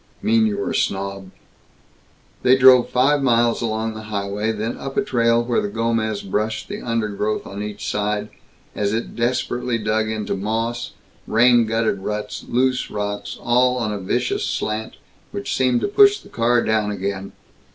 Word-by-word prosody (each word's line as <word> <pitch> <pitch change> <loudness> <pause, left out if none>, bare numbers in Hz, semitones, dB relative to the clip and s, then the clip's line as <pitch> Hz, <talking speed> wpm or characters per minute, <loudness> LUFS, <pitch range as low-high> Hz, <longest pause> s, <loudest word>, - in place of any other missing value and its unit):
" - - -34
mean 220 +1 +3
you 205 -2 -2
were 200 - -2
a - - -2
snob!" 100 -1 -2 1.1
They 130 +1 +5
drove 130 -1 +7
five 140 +3 +3
miles 120 -3 +2
along 110 -1 -2
the 110 0 -8
highway, 100 +1 -2
then 110 +2 -3
up 135 0 -6
a 210 - +3
trail 115 - +2
where 120 0 0
the - - -2
Gomez 110 0 -1
brushed 110 +3 -2
the - - -5
undergrowth 110 -2 -2
on 100 +1 -7
each 105 0 -5
side 105 0 -1 0.4
as 100 0 -1
it 115 +1 -3
desperately 120 0 -1
dug 110 0 0
into 110 -1 -2
moss, 115 +4 -2 0.3
rain 120 0 +4
gutted 110 -2 0
ruts, 105 +2 -4
loose 130 +1 +1
rocks, 105 0 -4
all 125 +1 +2
on 110 -4 -1
a 105 - -4
vicious 120 +6 -1
slant 110 +1 -3 0.4
which 100 - -3
seemed 125 -2 +2
to - - 0
push 405 - +5
the - - -16
car 120 +1 +2
down 110 -1 +1
again. 100 -1 -4
110 Hz, 170 wpm, -21 LUFS, 105-120 Hz, 1.1 s, drove